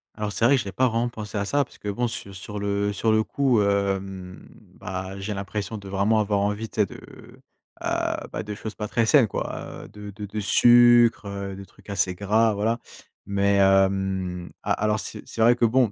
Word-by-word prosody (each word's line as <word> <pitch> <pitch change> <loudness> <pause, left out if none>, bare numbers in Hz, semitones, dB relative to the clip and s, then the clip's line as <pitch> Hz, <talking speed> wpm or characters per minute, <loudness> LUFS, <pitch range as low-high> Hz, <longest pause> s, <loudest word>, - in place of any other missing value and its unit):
Alors 105 -1 -3
c'est 115 - 0
vrai 135 +4 +6
que 130 - +1
j'ai 100 - -6
pas 130 +5 +2
vraiment 115 +1 0
pensé 110 -3 -6
à 100 - -1
ça 145 +7 +2
parce 125 - -17
que 105 - -6
bon, 120 +5 -1
su 100 -3 -6
sur 105 +2 -7
le 100 0 0
sur 110 +2 +1
le 110 0 +3
coup, 130 -3 +1
hem, 95 -2 -2 0.3
bah, 95 +1 -6
j'ai 100 +2 -3
l'impression 100 +2 -4
de 100 -1 -10
vraiment 100 +3 +2
avoir 105 -1 +1
envie, 105 +2 -1
tu 110 - 0
sais, - - +4
de, - - -11
heu, - - -14 0.9
bah - - -3
de 105 0 -6
choses 110 +1 -6
pas 105 - -4
très 115 +1 +1
saines 125 0 +5
quoi, - - -5
heu, - - -12
de 105 0 -9
de 105 +1 -7
de 105 +2 -5
sucre, 120 +1 +5
heu, 100 -1 -5
des 100 0 -9
trucs - - -20
assez 95 -2 0
gras, 110 +4 +2
voilà, 110 +3 0 0.5
mais, 100 0 +1
hem, 95 -2 +2
a - - -2
alors, 105 +1 0
c'est - - -6
c'est 115 - -4
vrai 120 +2 +6
que 120 - +2
bon, 120 -1 +3
105 Hz, 220 wpm, -24 LUFS, 100-115 Hz, 0.9 s, vrai